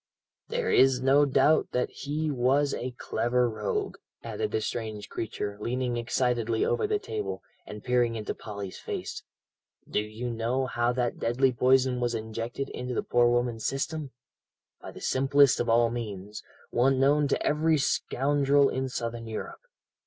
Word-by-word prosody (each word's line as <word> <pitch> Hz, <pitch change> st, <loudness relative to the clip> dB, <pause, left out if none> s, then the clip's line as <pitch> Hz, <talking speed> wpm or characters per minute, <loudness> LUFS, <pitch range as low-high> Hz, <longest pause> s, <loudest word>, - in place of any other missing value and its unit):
"There's 135 Hz, -, +3 dB
no 135 Hz, +3 st, +4 dB
doubt 150 Hz, +3 st, +3 dB
that 125 Hz, -, 0 dB
he 150 Hz, +2 st, -3 dB
was 135 Hz, +2 st, +2 dB
a 125 Hz, +1 st, -4 dB
clever 120 Hz, +3 st, +1 dB
rogue," 110 Hz, -3 st, -3 dB, 0.3 s
added -, -, -3 dB
the -, -, 0 dB
strange 110 Hz, -2 st, -4 dB
creature, 105 Hz, -2 st, -4 dB
leaning 125 Hz, +2 st, -1 dB
excitedly 120 Hz, -1 st, 0 dB
over 430 Hz, -, +1 dB
the 420 Hz, 0 st, +1 dB
table, 420 Hz, +1 st, -5 dB, 0.2 s
and 105 Hz, -1 st, -8 dB
peering 120 Hz, -2 st, +2 dB
into 110 Hz, -2 st, -3 dB
Polly's 100 Hz, -3 st, -7 dB
face. -, -, -5 dB, 0.7 s
"Do -, -, 0 dB
you 110 Hz, +3 st, -4 dB
know 120 Hz, +3 st, -1 dB
how 120 Hz, -1 st, 0 dB
that 125 Hz, -1 st, -1 dB
deadly 130 Hz, +3 st, +2 dB
poison 130 Hz, +1 st, +3 dB
was 120 Hz, -1 st, 0 dB
injected 115 Hz, +4 st, -4 dB
into 125 Hz, 0 st, -5 dB
the -, -, 0 dB
poor 120 Hz, 0 st, +3 dB
woman's 120 Hz, -2 st, 0 dB
system? 145 Hz, +2 st, -3 dB, 0.7 s
By -, -, -8 dB
the -, -, -11 dB
simplest 135 Hz, +1 st, +4 dB
of 120 Hz, -, 0 dB
all 115 Hz, 0 st, +4 dB
means, 105 Hz, -3 st, -6 dB, 0.3 s
one 130 Hz, +2 st, +3 dB
known 145 Hz, +2 st, +4 dB
to -, -, -1 dB
every 155 Hz, +1 st, +2 dB
scoundrel 140 Hz, 0 st, +2 dB
in 130 Hz, 0 st, -2 dB
Southern 115 Hz, -1 st, -4 dB
Europe. 110 Hz, -1 st, -6 dB
125 Hz, 155 wpm, -28 LUFS, 115-135 Hz, 0.7 s, no